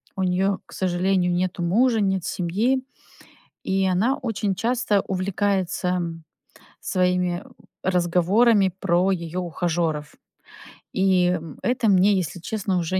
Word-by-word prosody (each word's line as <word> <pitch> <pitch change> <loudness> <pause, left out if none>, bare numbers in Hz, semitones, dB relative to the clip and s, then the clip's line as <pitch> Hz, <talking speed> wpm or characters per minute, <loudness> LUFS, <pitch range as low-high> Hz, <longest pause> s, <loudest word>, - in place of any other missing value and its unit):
у 190 - -1
неё, 190 +2 +1
к - - -15
сожалению, 180 0 +1
нету 180 0 -1
мужа, 225 +7 +3
нет 190 -2 0
семьи, 220 +10 0 0.8
и 190 0 0
она 200 +9 +2
очень 215 -5 -2
часто 230 -2 +1
увлекается, 190 -1 -1
м, 170 -2 -3 0.6
своими, 180 -1 0
э, - - -17 0.4
разговорами 185 +4 +3
про 180 +1 +2
её 170 0 -3
ухажёров. 165 -3 -2 0.8
И, 190 -2 +3
м, 165 -4 -5
это 245 -2 +1
мне, 195 +1 +5
если 180 -3 -2
честно, 195 +1 -2
уже 175 +2 -1
185 Hz, 125 wpm, -23 LUFS, 175-200 Hz, 0.8 s, мне